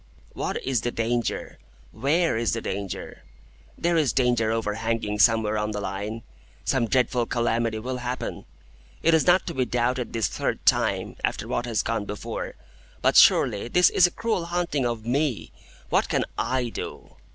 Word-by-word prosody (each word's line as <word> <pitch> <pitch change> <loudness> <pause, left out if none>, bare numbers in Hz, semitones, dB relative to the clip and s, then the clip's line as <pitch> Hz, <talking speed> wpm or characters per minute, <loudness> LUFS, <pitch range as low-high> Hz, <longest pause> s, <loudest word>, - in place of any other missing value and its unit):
"What - - -3
is 130 -4 0
the 120 - -1
danger? 120 -1 -2 0.3
Where 150 +8 +1
is 115 +1 0
the 115 - -2
danger? 100 -2 -5 0.6
There 170 0 +1
is 150 -5 +2
danger 120 -4 +2
overhanging 110 -1 -1
somewhere 110 -1 +4
on 105 0 -2
the 105 - -3
Line. 100 +3 -4 0.4
Some 125 -4 +1
dreadful 125 0 +1
calamity 115 -1 0
will 125 +4 -4
happen. 125 0 -4 0.6
It 165 - +4
is 160 +1 +3
not 180 +1 +5
to 170 - -4
be 130 -3 +1
doubted 125 +1 -1
this 115 -5 0
third - - -3
time, - - +2
after - - -1
what 120 0 -2
has 115 -3 0
gone 115 -2 -2
before. 105 0 -5 0.5
But - - +3
surely 100 +2 +5
this 180 +8 +4
is 180 - +5
a - - -7
cruel 220 -6 -1
haunting 170 -6 -1
of 115 -2 -4
me. 135 0 -1 0.4
What - - +2
can - - +1
I 125 -2 -1
do?" - - -7
120 Hz, 165 wpm, -25 LUFS, 110-135 Hz, 0.6 s, not